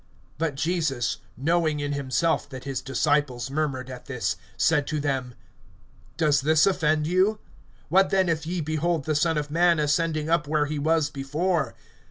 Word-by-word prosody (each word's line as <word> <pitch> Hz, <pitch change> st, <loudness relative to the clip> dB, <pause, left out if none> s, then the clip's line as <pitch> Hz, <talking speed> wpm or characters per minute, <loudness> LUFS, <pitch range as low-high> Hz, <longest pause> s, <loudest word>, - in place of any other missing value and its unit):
(61)But 160 Hz, -3 st, -1 dB
Jesus, 150 Hz, -6 st, -1 dB, 0.2 s
knowing 155 Hz, +2 st, +1 dB
in 145 Hz, 0 st, -2 dB
himself 140 Hz, +3 st, 0 dB
that 130 Hz, -2 st, -8 dB
his 135 Hz, -2 st, -3 dB
disciples 135 Hz, -2 st, 0 dB
murmured 140 Hz, -4 st, -2 dB
at 130 Hz, -1 st, -9 dB
this, 115 Hz, -8 st, -2 dB, 0.2 s
said 150 Hz, -3 st, +2 dB
to 155 Hz, -, -1 dB
them: 135 Hz, -4 st, -2 dB, 0.8 s
Does 150 Hz, -4 st, +3 dB
this 155 Hz, +2 st, +4 dB
offend 155 Hz, -5 st, +1 dB
you? 185 Hz, +6 st, +2 dB, 0.5 s
(62)What 190 Hz, +2 st, +5 dB
then 190 Hz, -1 st, +2 dB
if 160 Hz, -2 st, -1 dB
ye 175 Hz, 0 st, -2 dB
behold 155 Hz, 0 st, -1 dB
the 155 Hz, -, 0 dB
Son 160 Hz, +2 st, +1 dB
of 145 Hz, -1 st, -3 dB
man 170 Hz, +1 st, +4 dB
ascending 155 Hz, +1 st, 0 dB
up 165 Hz, -1 st, +1 dB
where 150 Hz, 0 st, +1 dB
he 150 Hz, 0 st, -3 dB
was 155 Hz, 0 st, +1 dB
before? 150 Hz, +4 st, -1 dB
150 Hz, 165 wpm, -25 LUFS, 140-165 Hz, 0.8 s, 62)What